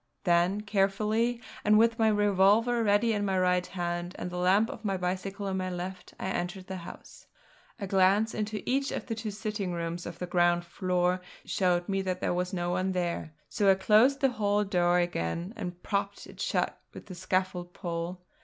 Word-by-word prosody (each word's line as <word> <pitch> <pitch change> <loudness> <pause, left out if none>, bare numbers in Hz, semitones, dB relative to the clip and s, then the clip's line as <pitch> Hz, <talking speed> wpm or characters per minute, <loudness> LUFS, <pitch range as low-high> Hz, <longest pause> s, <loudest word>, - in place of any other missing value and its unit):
Then 175 +2 +2
carefully, 215 +4 +1 0.2
and 210 +1 +5
with 230 +1 +3
my 220 - +4
revolver 210 +3 +3
ready 215 +2 +3
in 205 -1 -1
my 190 -2 0
right 180 0 +2
hand 175 0 -3
and 175 - -5
the 180 - -5
lamp 195 +5 +3
of - - -10
my 195 -3 0
bicycle 190 +2 -3
in 190 -1 -1
my 185 0 -2
left, 180 +1 -6
I - - -4
entered 185 +1 -3
the 190 0 -5
house. 170 - -11 0.5
A 200 - -3
glance 195 +3 +3
into 215 -1 -3
each 270 +2 +1
of - - -4
the 230 - -3
two 225 -1 -4
sitting 210 -3 -3
rooms 170 0 -4
of 170 -1 -7
the 180 - -4
ground 175 -1 +2
floor 180 +1 0 0.2
showed 175 -2 +1
me 195 -1 0
that 185 -1 -2
there - - 0
was 180 +1 -1
no 175 -1 -2
one 185 +1 0
there; 170 -3 -2
so 200 -2 +2
I 190 - +7
closed 225 +9 +4
the 270 - +4
hall 210 -3 +1
door 180 -3 +2
again, 175 - -1
and 180 -4 -6
propped 200 0 -2
it - - -11
shut - - -1
with - - -9
the 190 - -9
scaffold 185 0 -2
pole. 170 +1 -4
190 Hz, 195 wpm, -29 LUFS, 180-210 Hz, 0.5 s, I